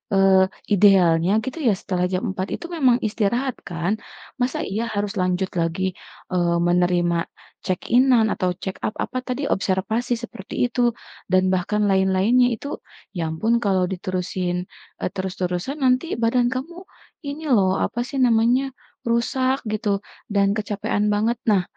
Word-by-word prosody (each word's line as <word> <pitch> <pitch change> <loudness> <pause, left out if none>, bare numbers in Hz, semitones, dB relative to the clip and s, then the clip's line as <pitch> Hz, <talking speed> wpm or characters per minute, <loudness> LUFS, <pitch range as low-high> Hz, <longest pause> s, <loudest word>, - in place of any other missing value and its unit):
eee, 190 -1 +5 0.2
idealnya 185 -3 +5
gitu 260 +7 -5
ya, 215 - +5
setelah 180 -1 -2
jam 185 0 -2
4 190 0 -3
itu 345 - -8
memang 260 -7 +4
istirahat 235 +5 0
kan? 170 +1 -2 0.5
Masa 250 +1 0
iya 220 +4 -2
harus 205 0 -1
lanjut 185 +1 0
lagi, 170 +3 0 0.4
eee, 175 -1 +2
menerima 175 -1 +2 0.4
check-in-an 235 +4 +3
atau 180 -1 -1
check 190 0 -6
up 215 - -3
apa 255 - -3
tadi? 255 +3 -2
Observasi 210 +3 0
seperti 220 -4 -8 0.2
itu, 240 -2 +1 0.3
dan 185 0 +3
bahkan 195 +3 0
lain-lainnya 195 +6 +3
itu, 285 +6 -6 0.3
ya 170 -4 -3
ampun 220 +9 +1
kalau 195 -5 +1
diterusin 180 -1 -2 0.4
e - - -1
terus-terusan 190 +8 -3
nanti 255 +3 +3
badan 235 +1 +2
kamu, 340 +8 -6 0.4
ini 290 +3 -5
lho, 190 -5 +4
apa 240 - -2
sih - - -8
namanya, 245 +3 +3 0.3
rusak 255 +3 +1
gitu, 210 -2 0 0.3
dan 200 -1 +3
kecapekan 210 0 -1
banget. 220 +3 +1 0.2
Nah, 195 -3 +3
205 Hz, 140 wpm, -22 LUFS, 185-240 Hz, 0.5 s, eee